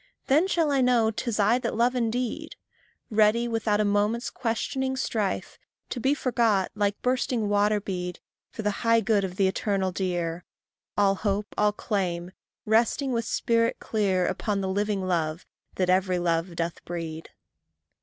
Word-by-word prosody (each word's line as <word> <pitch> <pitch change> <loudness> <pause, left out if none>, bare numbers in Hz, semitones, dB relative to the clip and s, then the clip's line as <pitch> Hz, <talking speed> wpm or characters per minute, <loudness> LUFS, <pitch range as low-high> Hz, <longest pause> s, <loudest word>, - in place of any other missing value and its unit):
Then 305 +7 +3
shall 330 -5 +1
I 275 -2 +3
know 240 -3 +3
'tis 225 0 -3
I 215 +5 +4
that 240 -2 -3
love 240 +3 +3
indeed 250 +5 -2 0.6
Ready, 220 +2 +3
without 225 -2 0
a 215 - +2
moment's 205 +3 +1
questioning 260 +3 -2
strife, 215 -6 -2 0.3
To 250 - -3
be 270 +5 +2
forgot, 230 -8 +1
like 205 -1 0
bursting 250 -3 0
water 205 +1 +2
bead, 180 -3 -4 0.3
For 220 - -7
the 210 - +1
high 230 -1 +4
good 205 -1 +2
of 185 -1 -4
the 195 0 +3
eternal 190 -1 0
dear; 175 -2 -2 0.5
All 200 -1 +4
hope, 205 +1 -2
all 210 0 +3
claim, 185 -4 -2 0.3
resting, 230 +5 +2
with 230 -1 -1
spirit 230 +1 +1
clear, 195 -4 0
Upon 205 +1 -1
the 190 - -2
living 200 0 -1
love 165 -2 -1 0.3
that 185 - 0
every 185 0 +2
love 170 0 0
doth 165 0 -3
breed. 165 -2 -6
210 Hz, 155 wpm, -26 LUFS, 190-235 Hz, 0.6 s, I